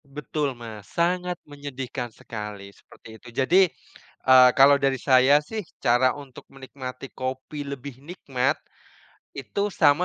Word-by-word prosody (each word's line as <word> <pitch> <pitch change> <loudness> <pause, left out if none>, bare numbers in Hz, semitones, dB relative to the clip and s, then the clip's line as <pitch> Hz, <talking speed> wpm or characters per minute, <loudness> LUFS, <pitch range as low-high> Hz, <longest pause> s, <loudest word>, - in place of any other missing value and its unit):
Betul, 140 -1 -3
Mas. 110 -4 -10
Sangat 180 +1 0
menyedihkan 135 -4 -6
sekali, 105 -3 -8
seperti - - -18
itu. - - -15
Jadi, 170 +9 +5 0.7
eee, 130 -1 +8
kalau 140 +1 +7
dari 135 -1 +2
saya 130 +2 +5
sih 220 -1 -3 0.2
cara 125 +2 +4
untuk 140 -3 -12
menikmati 130 -1 -9
kopi 130 +3 -5
lebih 135 -1 -8
nikmat, 140 -5 -2 0.8
itu 140 +8 -4
sama 150 +2 +4
135 Hz, 125 wpm, -25 LUFS, 125-145 Hz, 0.8 s, eee